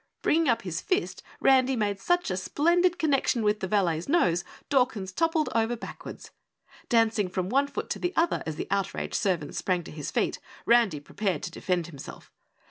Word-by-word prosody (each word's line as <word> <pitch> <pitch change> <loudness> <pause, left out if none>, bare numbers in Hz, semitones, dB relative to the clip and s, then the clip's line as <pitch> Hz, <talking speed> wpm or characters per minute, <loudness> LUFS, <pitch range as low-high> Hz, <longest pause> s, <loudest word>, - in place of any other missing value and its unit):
Bringing 320 -2 +3
up 235 -1 +1
his 170 -3 -3
fist, 375 +2 -1 0.2
Randy 265 0 +4
made 205 -3 -1
such 350 - +1
a - - 0
splendid 345 - +2
connection 275 -6 +1
with 210 0 +2
the 190 - -3
valet's 180 - 0
nose, 175 - +3 0.2
Dawkins 250 -9 +1
toppled 325 - +1
over 230 +1 +1
backwards. 230 - -9 0.6
Dancing 225 -4 +2
from 185 0 -2
one 275 +4 +2
foot - - -5
to - - -2
the 355 - -1
other 335 +1 +2
as 160 - -3
the - - -4
outraged 195 -1 -2
servant 175 -7 0
sprang 180 -2 0
to - - -10
his 150 -1 -5
feet, - - -1 0.3
Randy 235 -10 +4
prepared 185 +3 -3
to 175 - -4
defend 180 0 -1
himself. 150 -5 -11
215 Hz, 180 wpm, -27 LUFS, 180-275 Hz, 0.6 s, Randy